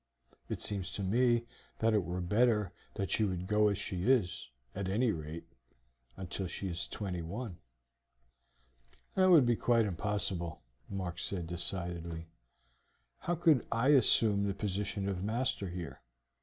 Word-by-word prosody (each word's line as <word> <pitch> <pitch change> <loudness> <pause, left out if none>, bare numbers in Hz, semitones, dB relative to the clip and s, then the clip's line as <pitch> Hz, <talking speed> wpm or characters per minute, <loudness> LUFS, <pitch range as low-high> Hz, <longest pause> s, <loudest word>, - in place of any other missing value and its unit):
It - - -3
seems 100 -3 -3
to 100 - -3
me 120 +4 +3 0.3
that 115 0 +2
it 105 -3 +3
were 90 +2 -3
better 105 +1 +2 0.2
that 95 - -2
she 110 - +2
would 90 -3 -1
go 105 +2 +3
as 100 -2 +1
she 90 -2 -3
is, 100 - +1 0.2
at 95 -1 -3
any 115 +4 +2
rate, 80 0 -6 0.7
until 95 0 -4
she 95 +2 -4
is 85 -1 -3
twenty 95 -4 -4
one." 95 +2 -6 1.5
"That 185 -1 +4
would 160 -8 +8
be 120 -1 +3
quite 115 0 +3
impossible," 95 -4 -3 0.3
Mark 90 -3 -4
said 90 -2 -3
decidedly. 85 -1 0 0.9
"How 175 - -1
could 160 -6 +4
I 115 +4 +2
assume 110 -6 +4
the 100 - -1
position 100 0 -2
of 95 -2 -2
master 110 -2 -1
here? 85 -1 -6
100 Hz, 145 wpm, -33 LUFS, 90-115 Hz, 1.5 s, would